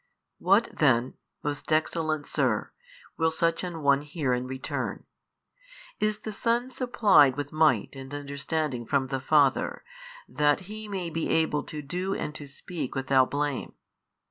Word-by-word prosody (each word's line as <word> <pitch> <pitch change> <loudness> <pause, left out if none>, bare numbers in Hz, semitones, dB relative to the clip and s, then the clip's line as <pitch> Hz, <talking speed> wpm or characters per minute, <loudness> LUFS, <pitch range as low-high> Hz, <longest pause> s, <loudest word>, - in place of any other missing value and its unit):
|608 - - -45 0.4
What 200 +5 +4
then, 130 -4 +3 0.3
most 145 +1 -4
excellent 155 -1 0
sir - - 0 0.5
(will 160 0 +3
such 165 +1 0
an 170 -4 -5
one 140 0 +4
hear 145 -3 -2
in 125 +1 -2
return), 130 0 -4 0.9
is 215 0 0
the 215 - -5
Son 235 +4 0
supplied 205 - +4
with 145 0 -4
might 155 -2 +2
and 135 0 -9
understanding 140 -3 -3
from 135 -2 +1
the 135 -1 -1
Father, 140 0 +2 0.4
that 150 +3 +2
He 215 +3 -8
may 185 -4 -4
be 165 0 -2
able 160 -2 +2
to 150 -2 -6
do 180 +7 -2
and 150 - -4
to 145 -2 -8
speak 145 0 -6
without 135 -1 +3
blame? 145 -1 -2
150 Hz, 150 wpm, -27 LUFS, 140-170 Hz, 0.9 s, What